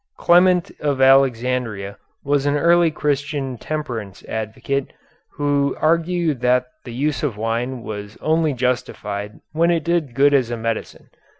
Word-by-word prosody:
Clement 180 Hz, +1 st, +4 dB
of 145 Hz, -3 st, -1 dB
Alexandria 125 Hz, -6 st, +2 dB, 0.3 s
was 145 Hz, 0 st, +1 dB
an 145 Hz, -, +2 dB
early 170 Hz, +2 st, +4 dB
Christian 145 Hz, -4 st, -2 dB
temperance 120 Hz, -11 st, -5 dB
advocate, 110 Hz, +5 st, -3 dB, 0.4 s
who 145 Hz, -1 st, 0 dB
argued 165 Hz, -3 st, +1 dB
that 125 Hz, 0 st, +3 dB, 0.2 s
the 120 Hz, -, -7 dB
use 145 Hz, +3 st, -1 dB
of 135 Hz, -9 st, -2 dB
wine 115 Hz, +3 st, -2 dB
was 105 Hz, 0 st, -7 dB
only 160 Hz, -1 st, +1 dB
justified 105 Hz, -5 st, -3 dB
when 165 Hz, +2 st, +2 dB
it 170 Hz, -2 st, +1 dB
did 165 Hz, -7 st, -1 dB
good 145 Hz, +2 st, +4 dB
as 130 Hz, -4 st, +3 dB
a 120 Hz, -, -3 dB
medicine. 115 Hz, 0 st, -5 dB
135 Hz, 135 wpm, -21 LUFS, 120-155 Hz, 0.4 s, Clement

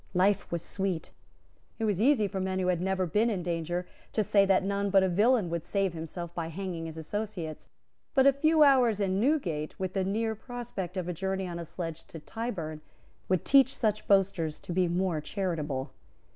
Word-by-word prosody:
Life 190 Hz, +2 st, +2 dB
was 170 Hz, -1 st, -2 dB
sweet. 190 Hz, -4 st, -3 dB, 0.7 s
It 225 Hz, -, -1 dB
was 205 Hz, -2 st, 0 dB
easy 240 Hz, -4 st, +4 dB
for 195 Hz, -1 st, -4 dB
men 190 Hz, 0 st, -1 dB
who 185 Hz, -1 st, +1 dB
had 175 Hz, -2 st, +1 dB
never 190 Hz, 0 st, 0 dB
been 210 Hz, +7 st, +2 dB
in 190 Hz, -6 st, -2 dB
danger 175 Hz, +1 st, -2 dB, 0.3 s
to 215 Hz, -, +2 dB
say 200 Hz, 0 st, +4 dB
that 190 Hz, -1 st, +4 dB
none 200 Hz, +1 st, 0 dB
but 195 Hz, -1 st, +5 dB
a -, -, +3 dB
villain 210 Hz, +3 st, +3 dB
would 170 Hz, -1 st, -2 dB
save 195 Hz, 0 st, 0 dB
himself 170 Hz, +1 st, -6 dB
by 170 Hz, -2 st, -3 dB
hanging 170 Hz, -1 st, -5 dB
his 160 Hz, 0 st, -8 dB
associates; 175 Hz, -1 st, -5 dB, 0.5 s
but 265 Hz, -1 st, +5 dB
a 275 Hz, -, +7 dB
few 310 Hz, +3 st, +4 dB
hours 250 Hz, -7 st, +5 dB
in 195 Hz, -1 st, +1 dB
Newgate, 200 Hz, -, 0 dB
with 185 Hz, -1 st, -2 dB
the 195 Hz, -, 0 dB
near 220 Hz, +4 st, 0 dB
prospect 220 Hz, -6 st, -6 dB
of 180 Hz, -2 st, -2 dB
a 180 Hz, -, -2 dB
journey 190 Hz, +2 st, -2 dB
on 170 Hz, -1 st, -5 dB
a 170 Hz, -, -5 dB
sledge 165 Hz, -1 st, -6 dB
to -, -, -10 dB
Tyburn, 165 Hz, -5 st, -5 dB, 0.5 s
would 185 Hz, -2 st, +1 dB
teach 270 Hz, -1 st, +5 dB
such 215 Hz, -2 st, 0 dB
boasters 190 Hz, -6 st, +2 dB
to 175 Hz, -, -5 dB
be 185 Hz, 0 st, +2 dB
more 175 Hz, -2 st, 0 dB
charitable. 150 Hz, -8 st, -3 dB
190 Hz, 200 wpm, -29 LUFS, 170-210 Hz, 0.7 s, a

